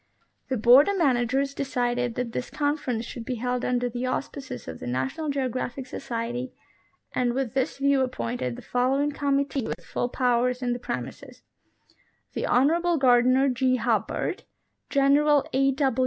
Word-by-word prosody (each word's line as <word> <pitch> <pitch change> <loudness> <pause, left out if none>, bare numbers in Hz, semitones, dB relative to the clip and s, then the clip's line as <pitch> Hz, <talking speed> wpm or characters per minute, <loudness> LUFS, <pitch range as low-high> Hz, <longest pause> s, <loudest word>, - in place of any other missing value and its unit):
The 260 - 0
Board 245 - +7
of 400 - 0
Managers 270 -2 +1
decided 245 -3 -1
that 245 -2 -3
this 250 - -4
conference 285 -6 -1
should 240 -1 -7
be 250 +2 -3
held 250 +1 -2
under 245 0 0
the 245 +1 -3
auspices 255 - -5
of 80 -1 -7
the - - -7
National 130 - -2
Geographic 260 -1 -2
Society, 245 0 -4 0.6
and 245 -1 0
with 260 -3 -2
this 265 -1 -1
view 275 0 +3
appointed 125 - -2
the - - -11
following 270 +4 +1
committee 280 -2 -1
with - - -6
full 245 - -2
powers 250 0 +1
in 245 -1 +1
the 245 - -4
premises: 235 - -6 0.9
The - - -2
Honorable 335 +7 +3
Gardiner 255 0 +4
G. 255 0 +2
Hubbard, 230 -4 -1 0.5
General 285 +1 +3
A. 270 0 +2
255 Hz, 150 wpm, -26 LUFS, 240-275 Hz, 0.9 s, Board